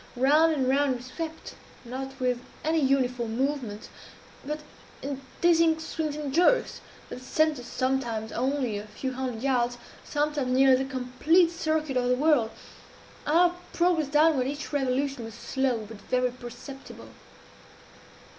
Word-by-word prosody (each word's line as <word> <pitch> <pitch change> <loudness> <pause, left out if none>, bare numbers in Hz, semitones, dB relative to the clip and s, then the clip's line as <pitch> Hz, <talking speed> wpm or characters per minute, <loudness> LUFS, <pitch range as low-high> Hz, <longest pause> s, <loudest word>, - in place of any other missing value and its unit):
Round 300 +6 +4
and 270 -5 0
round 275 0 +2
we 245 - -7
swept 320 +5 -6 0.3
not 265 +2 -6
with 250 -1 +1 0.2
any 320 +1 +2
uniform 250 -5 +1
movement 255 -6 -2 0.6
but 300 +2 -4 0.4
in 275 0 -4 0.2
dizzying 330 -2 +4
swings 315 -2 -3
and 295 -3 -4
jerks, 360 - +3 0.3
that 250 - -7
sent 310 +2 +1
us 245 - -9
sometimes 240 -4 -1
only 255 -4 -1
a 210 - -9
few 260 +5 -4
hundred 250 -3 -4
yards 245 -3 +1 0.3
sometimes 295 -3 -1
nearly 265 0 +5
the - - -10
complete 265 +7 +2
circuit 310 -4 -1
of 245 0 +1
the 250 - +4
whirl. 275 -5 +3 0.8
Our 345 +3 +4 0.2
progress 340 -4 +2
downward, 295 -2 +3
at 280 - -1
each 295 +1 -8
revolution, 270 -1 0
was 225 -2 -8
slow, 255 -5 -1
but 225 0 -10
very 250 -1 0
perceptible. 250 +3 -10
270 Hz, 145 wpm, -27 LUFS, 250-300 Hz, 0.8 s, nearly